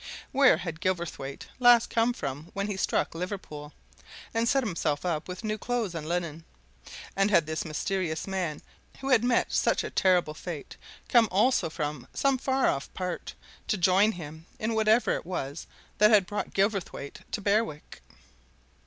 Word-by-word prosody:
Where 275 - +5
had 165 -2 -6
Gilverthwaite 170 -7 -3
last 245 -2 +6
come 230 +1 +3
from 145 - -5
when 200 0 -1
he 205 -1 -3
struck 190 - 0
Liverpool, 165 -4 -6 0.6
and 230 +1 +1
set 275 -1 +3
himself 165 -6 -1
up 165 -3 -1
with 180 +3 -7
new 215 0 -2
clothes 240 -7 -1
and 160 -1 -5
linen? 170 -2 -2 0.7
And 195 +1 +3
had 170 -6 +4
this 155 +1 -3
mysterious 160 +1 -2
man 185 -6 -3 0.4
who 270 - -3
had 245 -4 +5
met 245 -1 +2
such - - +2
a - - -5
terrible 180 -5 +3
fate 155 -2 -7 0.3
come 230 -3 +5
also 210 -1 +2
from 150 -4 -4
some 275 -2 +2
far 265 0 +1
off 135 - -1
part, 180 -1 -4 0.3
to 210 - +1
join 190 +4 +4
him 160 -1 -9
in 220 +1 -1
whatever 220 +2 +3
it - - -3
was 160 -4 -5 0.3
that 210 +1 +7
had 210 -4 +5
brought 205 +3 -4
Gilverthwaite 195 -8 -1
to - - 0
Berwick? 200 -6 -1
185 Hz, 160 wpm, -28 LUFS, 160-220 Hz, 0.7 s, that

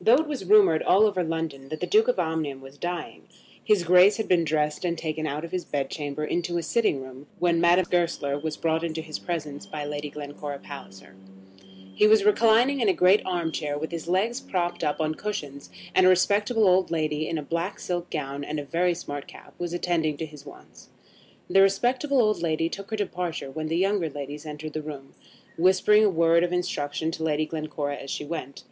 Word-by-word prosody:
Though 225 +5 +7
it 315 +4 +1
was 285 -10 -4
rumoured 190 -5 +5
all 195 +3 +4
over 195 -4 +1
London 160 -5 -4
that 155 - -5
the - - -1
Duke 435 +2 +3
of - - +1
Omnium 155 -4 -2
was 135 +1 -13
dying, 175 0 -5 0.4
his 210 -4 +3
Grace 180 +4 +6
had 220 - -2
been 175 -2 +3
dressed 150 0 -1
and 170 -1 -1
taken 155 -1 -3
out 150 +3 -3
of 170 - -10
his 185 -1 -2
bed 140 -2 -3
chamber 150 0 -4
into 175 +2 -1
a 170 - -2
sitting 160 - +1
room, 130 +2 -12
when 170 -1 +2
Madame 175 +1 +4
Goesler 165 -5 0
was 155 0 -3
brought 160 0 0
into 160 -1 -3
his 155 -1 -6
presence 150 -5 -5
by 150 -1 -5
Lady 145 0 -4
Glencora 145 0 -7
Palliser. 95 -10 -11 0.8
He 210 - +4
was 215 -1 +5
reclining 230 +6 +4
in 220 - +3
a - - +4
great 185 +4 +4
arm 175 -3 -1
chair, 145 -2 -3
with 160 +3 -4
his 165 -1 -5
legs 210 +8 0
propped 175 -2 -2
up 150 - 0
on 155 0 0
cushions, 145 -8 -6 0.2
and 185 0 +5
a - - +8
respectable 205 +4 +3
old 185 0 +3
lady 155 -2 -1
in 165 - -2
a 150 - -4
black 170 +6 -3
silk 175 -1 -3
gown 140 -2 -4
and 150 +1 -3
a 145 - -6
very 175 +4 +1
smart 145 -4 -6
cap - - -14
was 175 -1 -3
attending 170 -4 0
to 160 - -3
his 150 -2 -13
wants. - - -15 0.6
The 195 +2 +4
respectable 245 +8 +2
old 215 -6 +2
lady 165 0 0
took 200 +2 -7
her 220 - -2
departure 180 -8 -3
when 155 +2 -4
the 165 +1 -1
younger 190 -2 +1
ladies 145 +2 -7
entered 150 0 -7
the 155 - -3
room, 145 -3 -9 0.5
whispering 190 +4 +5
a 210 - +5
word 170 -1 +3
of 175 - 0
instruction 160 -3 -2
to 160 - -5
Lady 155 -1 +1
Glencora 155 -2 -4
as 135 - -9
she 150 - -4
went. 145 -3 -6
165 Hz, 215 wpm, -26 LUFS, 150-185 Hz, 0.8 s, a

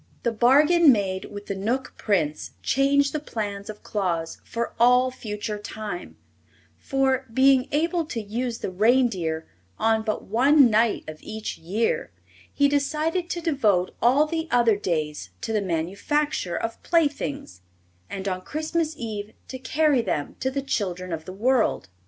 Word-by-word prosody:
The 235 - +1
bargain 290 +8 +5
made 195 -4 0
with 205 0 -9
the - - -3
Knook 230 +7 -2
Prince 160 -8 -1
changed 280 +1 +2
the 305 - -1
plans 205 -7 -5
of 210 -1 -9
Claus 170 -5 -2
for 235 0 -4
all 250 +2 +5
future 210 -3 -5
time; 205 -3 -7 0.6
for, 265 -1 0
being 260 +1 +4
able 335 +3 +1
to 265 -7 -4
use 230 +3 -3
the - - -4
reindeer 190 -7 +2 0.3
on 225 0 +2
but 220 -1 -2
one 260 +4 +5
night 225 +1 +2
of 155 0 -8
each 220 0 -6
year, 225 - -1 0.4
he 285 - +3
decided 310 +5 0
to 345 - -3
devote 215 - +1
all 260 +6 +5
the 320 +1 -3
other 235 -3 +4
days 155 - -2
to 225 - -3
the 215 - +1
manufacture 190 - -1
of 230 0 -4
playthings, 285 - -1 0.5
and 195 0 -5
on 185 -1 -2
Christmas 315 - -2
Eve 215 -3 -5 0.2
to 260 - -6
carry 285 0 +2
them 145 -10 -3
to 260 - 0
the 275 +1 -3
children 185 -8 -2
of 160 -1 -5
the 185 - -7
world. 235 - +1
230 Hz, 150 wpm, -25 LUFS, 200-275 Hz, 0.6 s, bargain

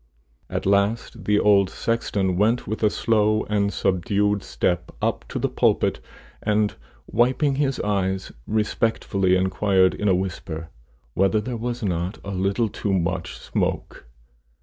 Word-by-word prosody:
At - - -3
last 100 +4 +1
the 105 0 +3
old 100 -2 +4
sexton 100 -5 -1
went 110 +6 +2
with 110 +2 -4
a 105 - +4
slow 110 0 +2
and 100 -1 0
subdued 100 +2 +1
step 90 -1 -1
up - - -1
to - - -5
the - - +1
pulpit, - - +1 0.4
and, 105 0 +1 0.3
wiping 130 +4 +2
his 135 -3 0
eyes, 95 -2 -1 0.2
respectfully 105 -3 +1
inquired, 95 0 +2
in 105 - -2
a 95 - +4
whisper, 85 -3 -4 0.4
whether 95 +6 +2
there 120 +3 -4
was 120 +1 -4
not 90 -1 -2
a 100 - -4
little 100 +4 0
too 100 -1 -3
much 90 -1 -1
smoke. - - -3
100 Hz, 140 wpm, -23 LUFS, 95-110 Hz, 0.4 s, old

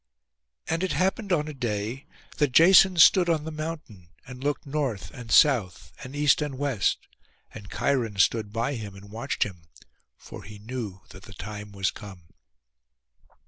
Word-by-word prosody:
And 165 +1 -1
it 185 -4 -1
happened 190 +6 -1
on 155 -4 +1
a 155 - -6
day 120 0 -4 0.3
that 145 -4 +1
Jason 185 +3 +7
stood 175 +2 +6
on 160 -3 +1
the 160 - -6
mountain, 155 - -7 0.2
and 125 0 -10
looked 145 0 -2
north 140 -7 -3
and 120 -4 -9
south 115 - +3
and 130 +2 -9
east 145 +1 +3
and 145 -3 -3
west; 135 -8 0 0.6
and 100 -2 -10
Cheiron 120 -7 -1
stood 105 +2 +2
by 115 +5 -1
him 105 -6 -7
and 100 +1 -13
watched 115 +5 -1
him, 90 -5 -9 0.5
for - - -11
he 105 +1 -11
knew 105 -3 -6
that 95 - -13
the 100 - -13
time 105 +2 -8
was 95 -1 -1
come. 95 -4 -11
125 Hz, 165 wpm, -26 LUFS, 105-150 Hz, 0.6 s, Jason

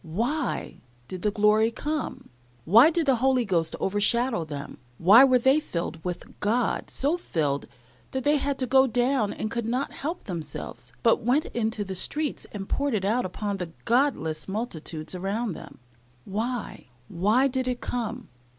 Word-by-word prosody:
Why 240 - -2 0.3
did 185 -1 -7
the 210 - +2
glory 210 +2 +3
come? 300 +6 -4 0.4
Why 230 - +7
did 335 -1 0
the 265 -3 +3
Holy 255 0 +2
Ghost 170 -5 0
overshadow 210 +1 +1
them? 145 -3 -7 0.2
Why 205 +9 +8
were 255 -2 +5
they 265 +4 +4
filled 170 - -5
with 180 -1 -6
God 230 +3 0
so 295 +6 0
filled 150 - -2 0.4
that 265 -1 -3
they 295 +1 +3
had 280 0 -1
to 260 - -1
go 265 +2 +5
down 245 -2 +1
and 215 - -4
could 235 -1 -2
not 255 +4 -1
help 325 +6 -5
themselves, 170 -6 -6
but 230 0 +4
went 250 +7 +2
into 220 -2 -2
the 190 -1 -5
streets 295 - -2
and 195 -2 -6
poured 280 -4 0
it 195 -2 -1
out 225 +3 +1
upon 200 +2 -3
the 175 -3 -6
godless 235 - +1
multitudes 175 -7 -4
around 195 +4 -2
them? 140 - -11 0.5
Why, 225 - -4 0.2
why 215 +10 +2
did 260 -1 -2
it 250 -1 -1
come? 240 0 -4
230 Hz, 165 wpm, -26 LUFS, 190-260 Hz, 0.5 s, Why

